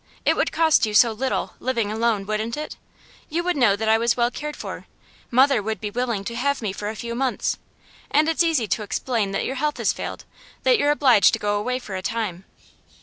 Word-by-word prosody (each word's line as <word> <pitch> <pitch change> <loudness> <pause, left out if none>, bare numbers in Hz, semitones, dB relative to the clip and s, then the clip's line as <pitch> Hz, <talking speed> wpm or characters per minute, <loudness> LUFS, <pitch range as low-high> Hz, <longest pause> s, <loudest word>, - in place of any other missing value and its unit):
It - - +4
would - - 0
cost 320 -8 +3
you 210 - -3
so 230 +2 +6
little, 255 +4 -2
living 235 -5 -1
alone, 220 -2 0
wouldn't 215 +3 -2
it? 305 - -5 0.5
You 335 +2 -1
would 360 0 0
know 240 -8 +4
that 220 +2 -3
I 220 0 +4
was 235 +1 +1
well 240 0 +2
cared 300 +3 -5
for; - - -7 0.4
mother 260 -1 +4
would 220 +2 -3
be 210 -1 -4
willing 235 -3 -2
to 235 +3 -5
have 280 +4 0
me 210 -4 -3
for 205 +1 -4
a 220 - -5
few 235 +3 -5
months, 255 +1 -1 0.5
and 300 +2 +3
it's 325 +1 +2
easy 320 -10 +2
to 215 - -1
explain 210 0 -1
that - - -1
your 265 - -3
health 300 0 0
has - - +1
failed, - - -6 0.4
that - - +4
you're 290 - +2
obliged 260 -9 +5
to - - 0
go 205 0 0
away 250 +5 -1
for 210 -6 -7
a 185 - -3
time. 195 -3 -3
235 Hz, 225 wpm, -23 LUFS, 215-275 Hz, 0.5 s, so